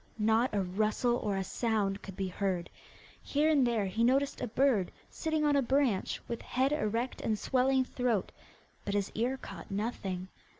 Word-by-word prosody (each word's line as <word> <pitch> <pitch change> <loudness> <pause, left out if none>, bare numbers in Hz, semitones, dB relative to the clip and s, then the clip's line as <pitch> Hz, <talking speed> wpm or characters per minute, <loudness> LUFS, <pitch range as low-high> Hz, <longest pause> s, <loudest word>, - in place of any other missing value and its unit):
Not 225 +3 +3
a 200 - +2
rustle 215 +6 +1
or 205 -5 -1
a 190 - 0
sound 205 -2 -1
could 195 - -9
be 190 0 -2
heard. 185 -1 -2 0.5
Here 300 +2 +2
and 275 -5 +4
there 225 -4 +1
he 205 +5 0
noticed 270 +3 +2
a - - -1
bird 235 -5 +2 0.2
sitting 315 -1 -1
on 290 -1 +3
a 280 - +4
branch, 260 -5 +1
with 235 - -4
head 260 +2 0
erect 240 -4 -1
and 215 -1 0
swelling 260 +3 +2
throat, 245 -6 -1 0.5
but 200 - -2
his 200 -1 0
ear 245 +4 0
caught 195 -8 -9
nothing. 195 -3 -3
230 Hz, 175 wpm, -31 LUFS, 200-260 Hz, 0.5 s, and